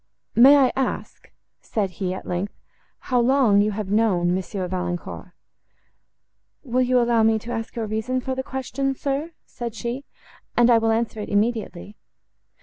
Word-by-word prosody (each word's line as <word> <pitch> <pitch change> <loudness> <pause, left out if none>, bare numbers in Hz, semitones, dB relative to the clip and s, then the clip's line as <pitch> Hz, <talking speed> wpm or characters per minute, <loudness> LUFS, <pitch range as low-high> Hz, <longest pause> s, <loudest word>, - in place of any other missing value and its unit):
"May 265 +5 +8
I 265 -3 +4
ask," 265 -1 -3 0.3
said 200 -4 -2
he, 180 0 -3
at 185 - -6
length, 180 +3 -3 0.4
"how 250 -2 0
long 240 -5 +4
you 210 - +2
have 200 -1 -4
known 190 -5 +2
Monsieur 185 0 -3
Valancourt?"—"Will 180 - -7
you 250 0 +3
allow 235 -1 +3
me 220 0 +4
to 230 +2 -7
ask 225 -1 -4
your 230 -2 -2
reason 220 +4 -2
for 260 +1 -3
the 260 - -2
question, 265 +1 -3
sir?" 285 +5 -3
said 235 -2 -6
she; 240 +5 -4 0.5
"and 240 0 +5
I 230 - +6
will 225 0 +1
answer 225 0 0
it 210 - -5
immediately." 210 -2 -1
230 Hz, 155 wpm, -23 LUFS, 205-255 Hz, 0.5 s, May